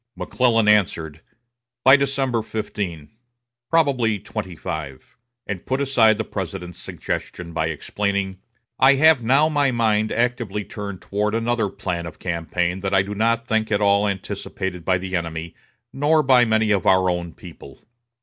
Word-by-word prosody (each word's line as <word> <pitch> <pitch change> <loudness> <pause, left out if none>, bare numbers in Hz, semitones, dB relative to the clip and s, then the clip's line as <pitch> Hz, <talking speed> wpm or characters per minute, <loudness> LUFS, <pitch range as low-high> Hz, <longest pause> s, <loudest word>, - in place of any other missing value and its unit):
McClellan 115 -4 +1
answered: 85 -7 +1 0.6
"By 130 +1 +8
December 135 -4 0
15, 100 -8 -5 0.6
probably 135 -9 +2
25"; 90 -9 -7 0.3
and 100 -4 -5
put 130 +1 -2
aside 120 -6 +3
the 110 - -1
President's 90 -3 -6
suggestion 85 -1 -5
by 80 -1 0
explaining: 95 +4 -2 0.4
"I 130 +1 +6
have 155 -2 +5
now 135 +6 +4
my 145 -3 +2
mind 110 -3 +1
actively 120 -4 -1
turned 100 -6 -7
toward 105 +2 -1
another 115 -2 0
plan 85 -3 -4
of 85 - -10
campaign 90 +1 -2
that 95 0 -1
I 95 - +4
do 100 +1 -6
not 115 +2 +1
think 110 -1 0
at 100 - +2
all 100 0 +3
anticipated 95 -2 -4
by 90 +1 +2
the 95 +1 -4
enemy, 85 -1 -4 0.4
nor 150 +3 +2
by 130 -2 +5
many 110 -1 +2
of 100 -2 +1
our 95 -1 +4
own 85 -1 -2
people." 85 - -13
105 Hz, 150 wpm, -22 LUFS, 90-120 Hz, 0.6 s, By